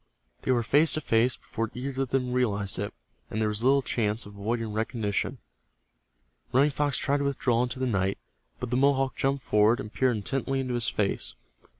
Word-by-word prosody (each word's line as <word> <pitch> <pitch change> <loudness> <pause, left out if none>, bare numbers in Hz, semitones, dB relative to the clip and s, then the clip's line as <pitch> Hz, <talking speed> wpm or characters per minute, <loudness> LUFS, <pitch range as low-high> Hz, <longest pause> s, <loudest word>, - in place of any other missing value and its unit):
They - - 0
were 120 -2 +2
face 150 +7 +4
to 155 - +3
face 115 0 +2
before 115 -1 -4
either 135 +2 -3
of 135 - -1
them 125 -1 0
realized 105 -7 0
it, 100 +1 -2 0.4
and 110 - -3
there 110 -1 +1
was 105 +2 -2
little 135 +1 +4
chance 110 -2 0
of 105 - -11
avoiding 110 +2 -2
recognition. 110 -2 -1 1.1
Running 140 +4 +4
Fox 145 0 0
tried 140 +1 +1
to 140 - -1
withdraw 125 -4 +1
into 125 +1 -2
the 130 - -1
night, 95 -5 0 0.4
but 125 -2 -4
the 125 - +2
Mohawk 135 -1 +2
jumped 135 0 0
forward 105 +4 +3
and 105 -4 -7
peered 130 -3 +2
intently 135 +5 -2
into 130 -2 -2
his 120 -1 +1
face. 100 -2 -1
125 Hz, 195 wpm, -27 LUFS, 110-135 Hz, 1.1 s, face